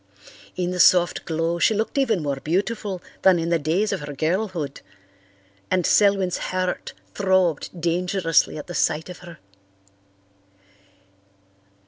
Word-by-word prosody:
In 180 -1 -2
the 180 - -4
soft 175 0 +4
glow 165 +1 -1
she 220 - +3
looked 220 +6 -2
even 230 - +1
more 140 -2 -2
beautiful 195 +5 -2 0.2
than 190 -2 +5
in 165 0 -2
the 170 -1 +2
days 170 +8 0
of 195 - -2
her 145 -1 -7
girlhood, 165 -1 -2 0.9
and 180 -1 +1
Selwyn's 195 -3 +3
heart 185 0 -3 0.2
throbbed 185 -4 0
dangerously 175 -1 +1
at 170 +3 -7
sight 155 +3 0
of 180 - -9
her. 175 -3 -12
180 Hz, 125 wpm, -23 LUFS, 165-190 Hz, 0.9 s, than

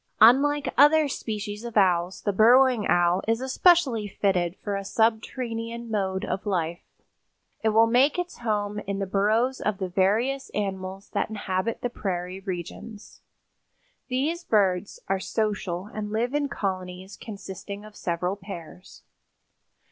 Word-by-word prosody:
Unlike 275 +6 +5
other 300 +1 +6
species 210 -4 -5
of 235 -2 -4
owls, 180 -2 +2
the 205 - 0
Burrowing 240 +2 +5
Owl 175 +1 +3
is 225 +1 +2
especially 265 - +3
fitted 185 -3 0
for 205 0 -4
a 195 - -3
subterranean 230 +2 -1
mode 190 -3 -1
of 195 +2 -4
life. 170 -3 -1 0.8
It 220 - +3
will 220 +1 +5
make 250 +7 +3
its 355 0 -4
home 210 -3 -1
in 200 0 -2
the 195 - -1
burrows 215 +7 +1
of 210 -2 -1
the 190 -1 -3
various 225 +9 +1
animals 190 -1 -4
that - - -1
inhabit 205 0 -2
the 245 - -1
prairie 185 -3 -4
regions. 195 +3 -7 0.9
These 295 +7 -1
birds 195 - +1
are 195 0 0
social 205 -4 -2
and 210 -1 -4
live 235 +4 -1
in 290 -1 0
colonies 185 -2 -4
consisting 200 -1 -8
of 215 -1 -13
several 180 +2 -2
pairs. 185 -3 -10
210 Hz, 140 wpm, -26 LUFS, 190-235 Hz, 0.9 s, other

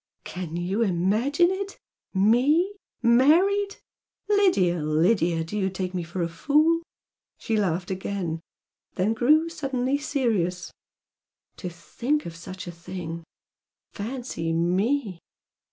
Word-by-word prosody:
"Can 170 -2 -6
you 185 +6 -1
imagine 225 - +2
it! 390 +1 -4 0.3
ME, 255 - +3 0.3
married? 350 +12 +4 0.5
Lydia, 200 - +3
Lydia, 165 +2 +2
do 165 +6 -7
you 195 -2 +1
take 185 -1 -4
me 180 - -1
for 170 +1 -3
a - - 0
fool!" 300 - +2 0.6
She 225 - -2
laughed 180 -3 0
again 185 -3 -3 0.5
then 200 +5 +1
grew 300 +8 +4
suddenly 275 -4 -1
serious. 210 - -1 0.8
"To 180 - -5
think 245 - -2
of 165 - -7
such 185 +2 -8
a 175 - -6
thing! 170 -1 -7 0.7
Fancy 220 -7 -4
ME! 190 +5 0
200 Hz, 115 wpm, -25 LUFS, 175-280 Hz, 0.8 s, married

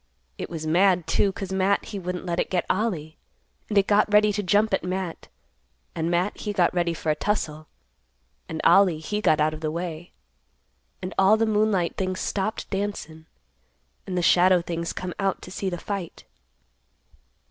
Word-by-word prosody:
It - - -5
was 160 -2 -5
mad, 180 +2 +3
too, 200 - +2
'cause 190 0 -6
Matt 190 +1 +1
he 205 - -6
wouldn't 180 0 -5
let 170 -1 -2
it - - 0
get 180 -2 0
Ollie. 170 -8 -2 0.5
And 210 - 0
it 195 - +5
got 210 +1 +3
ready 210 0 +5
to 205 - -1
jump 205 +3 +2
at - - +1
Matt, 185 -1 -4 0.7
and 165 +1 -2
Matt 175 +3 0
he 210 - -3
got 180 -4 +2
ready 170 -2 0
for 160 - -1
a - - 0
tussle, 155 -5 -2 0.8
and 160 - -4
Ollie 190 -5 +5
he 210 +7 -3
got 155 - +3
out 155 +1 +2
of 155 - -7
the 155 - -1
way. 170 0 -5 0.9
And 185 - -4
all 195 +3 +6
the 225 - +2
moonlight 210 -5 +1
things 185 -1 -2
stopped 205 +2 -2
dancin', 195 -6 -4 0.8
and 185 -2 -3
the 175 - 0
shadow 180 +1 +5
things 170 0 -3
come 180 -1 -5
out 195 -1 0
to 180 - -10
see 195 0 -2
the 175 - -4
fight." 190 -2 -6
185 Hz, 180 wpm, -25 LUFS, 170-200 Hz, 0.9 s, all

